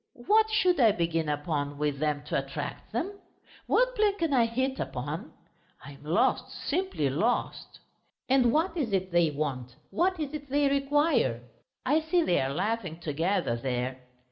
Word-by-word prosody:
What 440 +1 +4
should 365 -6 +2
I 225 -5 +6
begin 165 -3 -1
upon 145 -1 -2
with 145 -1 -1
them 150 -1 -1
to 150 - -4
attract 135 0 -6
them? 375 - -3 0.5
What - - +2
plan 420 -2 +2
can 330 -5 0
I 240 -3 +4
hit 260 +3 -1
upon? - - -4 0.5
I 145 - -9
am 140 0 -15
lost, 155 +3 +1 0.2
simply 350 - 0
lost.... 200 - -1 0.5
And 255 -2 +4
what 325 +8 +1
is 265 -11 -2
it 190 -1 0
they 170 -2 +4
want, 135 -4 -4 0.2
what 365 +1 +1
is 300 -1 -3
it 290 -2 -7
they 285 +1 +2
require?... 275 - +1 0.4
I 295 +5 +3
see 340 +2 +2
they 175 - +2
are 135 +1 -1
laughing 185 0 -2
together 165 -3 0
there. 125 +1 -3
215 Hz, 165 wpm, -28 LUFS, -, 0.5 s, I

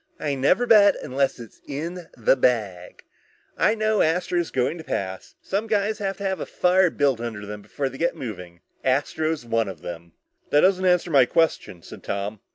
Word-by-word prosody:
I 145 - -1
never 140 - +2
bet 210 -4 +6
unless 135 0 -1
it's 115 -2 -12
in 165 +5 -5
the 115 +3 +3
bag. 105 -9 -1 0.5
I 215 - +2
know 215 -1 +1
Astro's 175 +1 0
going 130 +6 -1
to - - -8
pass. 95 -9 -5
Some 205 +3 -2
guys 210 0 0
have 195 -2 -3
to 200 - -7
have 190 -1 -1
a - - -4
fire 180 0 +3
built 140 -6 +1
under 110 -3 -5
them 105 0 -7
before 140 +6 -4
they 135 0 -8
get 170 - 0
moving. 90 -7 -8 0.2
Astro's 145 +2 0
one 115 -2 0
of 95 - -8
them." 85 -1 -8 0.4
"That 145 - +4
doesn't 185 0 +3
answer 180 -1 +2
my 135 -4 +5
question," 155 - 0
said - - -11
Tom. 100 +1 -4
145 Hz, 185 wpm, -24 LUFS, 115-180 Hz, 0.5 s, bet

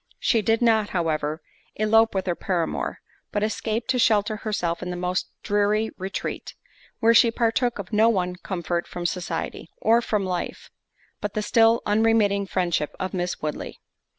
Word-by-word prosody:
She 230 -4 +2
did 225 +3 +1
not, 220 -3 +3
however, 155 -2 -1 0.3
elope 225 +1 +3
with 190 - 0
her 180 - +1
paramour, 170 -2 -2 0.3
but 205 - -1
escaped 220 +2 -2
to 255 - 0
shelter 215 -2 +3
herself 180 -6 -2
in 180 - -4
the 180 - -3
most 180 +1 -2
dreary 210 +1 +1
retreat; 190 +1 -5 0.5
where 230 0 +5
she 235 0 +6
partook 230 +1 0
of 200 +1 -7
no 220 +2 +5
one 180 -4 0
comfort 175 -2 -3
from 175 -1 -6
society, 170 -2 -3
or 230 +2 +4
from 210 -4 -1
life, 180 -2 -4 0.5
but 205 -1 -4
the 215 - 0
still 225 +2 +4
unremitting 210 -2 +2
friendship 175 -5 -1
of 185 +1 -3
Miss 180 -3 -3
Woodley. 150 -1 -4
205 Hz, 160 wpm, -24 LUFS, 180-225 Hz, 0.5 s, she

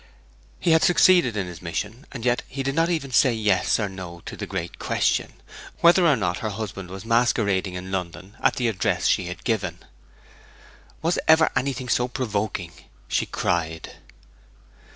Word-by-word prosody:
He 175 - +1
had 160 0 +5
succeeded 175 - +4
in 100 - -1
his 90 -2 -9
mission, 105 - -5
and 120 -3 -7
yet 120 0 +2
he 135 +1 -4
did 135 +1 -1
not 165 +3 +2
even 155 -6 -2
say 125 -1 +4
yes 105 -2 +2
or 105 - 0
no 90 -3 -9
to - - -7
the - - -6
great 85 +1 -5
question, - - 0 0.5
whether 170 +1 +6
or 150 - +5
not 90 -6 -1
her 110 - -2
husband 100 -3 -6
was 95 +2 -8
masquerading 105 -5 +1
in 90 +1 -6
London 95 +2 -5
at - - +3
the 125 - 0
address 100 -5 0
she - - +2
had 90 - -7
given. 95 -7 -1 1.3
'Was 170 +2 +1
ever 160 0 +6
anything 130 0 -1
so 125 +1 +1
provoking!' 105 -8 -3 0.3
she - - 0
cried. 80 -2 -2
110 Hz, 170 wpm, -24 LUFS, 95-130 Hz, 1.3 s, whether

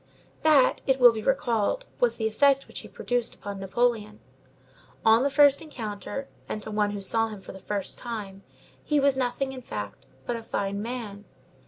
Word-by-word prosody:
That, 295 -5 +4
it 265 0 +3
will 245 -1 +9
be 220 - -4
recalled, 245 - 0
was - - +3
the 220 - -3
effect 275 +5 +3
which - - -6
he - - -10
produced 245 -2 -2
upon 200 -1 -7
Napoleon. 215 +1 0 0.9
On 225 +1 +6
the 280 - +2
first 280 0 +5
encounter, 235 -2 -6 0.2
and - - -3
to 215 - -6
one 210 -1 +1
who 205 -1 -5
saw 225 +3 +1
him 215 -2 -8
for - - -10
the 190 - -10
first 200 +1 -3
time, 205 -5 -6 0.4
he 300 -1 +2
was 275 -1 +3
nothing, 265 +1 -1
in 260 -1 -8
fact, 105 - -7 0.2
but 240 - -2
a 230 - -5
fine 200 -2 -3
man. 215 -3 -6
230 Hz, 185 wpm, -27 LUFS, 205-265 Hz, 0.9 s, will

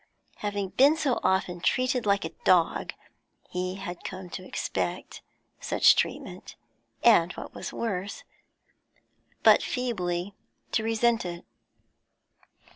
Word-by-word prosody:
Having 205 -2 -3
been 280 +9 +4
so 275 -6 0
often 185 -2 +1
treated 255 0 +1
like 200 -3 +2
a 160 - -5
dog, 175 -3 +3 0.6
he 180 +1 -2
had 185 -2 -7
come 185 -2 -7
to 185 - -6
expect - - -4 0.4
such - - +5
treatment, - - -3 0.5
and, 180 -7 +6
what - - -9
was - - -6
worse, 200 -3 -4 1.2
but - - +7
feebly 195 -7 -2 0.4
to 220 - +1
resent 225 +1 +2
it. 175 -1 -6
195 Hz, 115 wpm, -27 LUFS, 180-230 Hz, 1.2 s, but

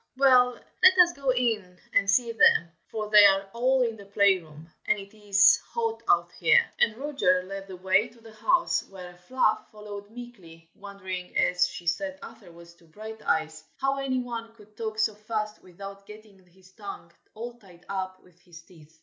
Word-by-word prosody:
well, 250 -2 +4 0.3
let 375 0 +7
us 345 0 -3
go 275 -1 -4
in 220 -8 -1 0.2
and 200 - +2
see 235 +3 +2
them, 225 -6 +4 0.2
for 215 -1 -5
they 210 -1 +9
are 195 0 +4
all 255 +2 +2
in 230 -2 -2
the 200 -2 -13
play 200 -1 +3
room, 155 -1 -15 0.2
and 215 - +2
it 200 +1 -11
is 200 -1 +5 0.2
hot 455 -1 -2
out - - +3
here!" - - +5 0.2
And 225 -1 +2
Roger 260 -11 +1
led 195 +1 -8
the 190 - -9
way 190 +4 +2
to 235 0 -21
the 225 -1 -15
house, 345 +12 +1
while 180 -2 -11
Fluff 215 +5 -1
followed 205 -1 -10
meekly, 190 -9 -13
wondering, 190 -2 -7
as 180 0 +3
she 175 - -10
said 280 +12 -2
afterwards 170 -7 -13
to 170 - -23
Brighteyes, 160 -5 -4
how 270 +1 -1
any 270 -1 -1
one 235 -2 -5
could 210 -1 -20
talk 220 -1 -5
so 220 0 +1
fast 215 0 -5
without 195 +2 -11
"getting 210 -2 -15
his 185 +1 -22
tongue 195 -5 -10 0.2
all 235 +2 -7
tied 180 -4 -19
up 190 -1 -5
with 180 -1 -24
his 170 -2 -15
teeth." 160 -2 -20
205 Hz, 185 wpm, -26 LUFS, 185-230 Hz, 0.3 s, they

